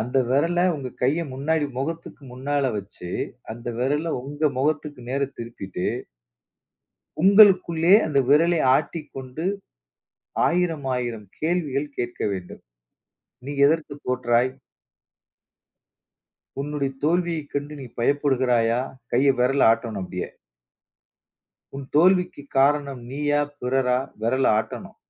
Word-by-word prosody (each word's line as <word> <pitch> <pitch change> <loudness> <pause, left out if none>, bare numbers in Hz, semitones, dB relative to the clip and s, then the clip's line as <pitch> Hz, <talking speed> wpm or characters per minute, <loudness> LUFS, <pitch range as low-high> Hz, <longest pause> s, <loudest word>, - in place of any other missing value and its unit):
அந்த 120 +4 -2
விரல 165 +7 +2
உங்க 135 -3 -5
கையை 150 +7 +2
முன்னாடி 145 +3 0
முகத்துக்கு 160 +2 -5
முன்னால 135 +1 -1
வச்சு, 95 -3 -9 0.4
அந்த 120 +1 -13
விரல 150 +5 0
உங்க 145 +2 -1
முகத்துக்கு 145 -1 -1
நேர 140 - -1 0.2
திருப்பிட்டு 100 -6 -5 1.4
உங்களுக்குள்ளே 185 -4 +6
அந்த 150 -3 +1
விரலை 165 +4 +4 0.2
ஆட்டிக்கொண்டு, 145 -2 -5 1.0
ஆயிரமாயிரம் 130 - -1
கேள்விகள் 155 -4 -1
கேட்க 120 0 -4
வேண்டும். 90 -2 -8 0.8
"நீ 145 - -4
எதற்குத் 150 -2 -2
தோற்றாய்?" 125 0 +2 2.1
"உன்னுடைய 145 -1 -2
தோல்வியைக் 165 -1 0
கண்டு 145 +1 -3
நீ 130 - -7
பயப்படுகிறாயா?" 125 -3 +2 0.3
கைய 135 +1 +4
விரல 130 -1 +4
ஆட்டணும். 115 -4 -3
அப்பிடியே. 90 0 -5 1.5
"உன் 140 - -5
தோல்விக்குக் 180 -3 +3
காரணம் 140 -1 +2
நீயா! 145 +1 +1 0.2
பிறரா?" 125 0 +1 0.2
விரல 130 +4 +2
ஆட்டணும். 110 - -6
140 Hz, 100 wpm, -24 LUFS, 125-155 Hz, 2.1 s, உங்களுக்குள்ளே